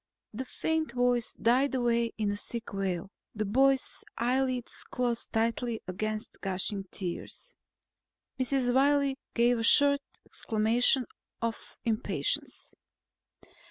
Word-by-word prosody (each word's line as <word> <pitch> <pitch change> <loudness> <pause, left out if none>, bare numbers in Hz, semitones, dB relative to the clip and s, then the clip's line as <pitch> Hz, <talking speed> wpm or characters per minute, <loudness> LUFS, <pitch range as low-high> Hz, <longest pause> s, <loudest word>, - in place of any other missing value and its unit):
The 255 +5 -4
faint 320 0 -1
voice 245 -1 +1
died 255 +5 +3
away 235 -2 +2
in 210 -2 0
a - - -1
sick 230 +2 -7
wail. 190 -1 -2 0.2
The 215 0 -1
boy's 265 +5 +2
eyelids 250 0 -1
closed 240 -2 -2
tightly 230 +1 0
against 215 +4 -4
gushing 195 +1 -2
tears. 180 -3 -6 0.9
Mrs. 255 -1 +1
Wiley 275 0 +3 0.2
gave 240 0 +4
a - - -1
short 280 +4 +5 0.2
exclamation 235 +4 +1 0.3
of 230 -1 -4
impatience. 220 -2 -2
235 Hz, 110 wpm, -30 LUFS, 215-260 Hz, 0.9 s, short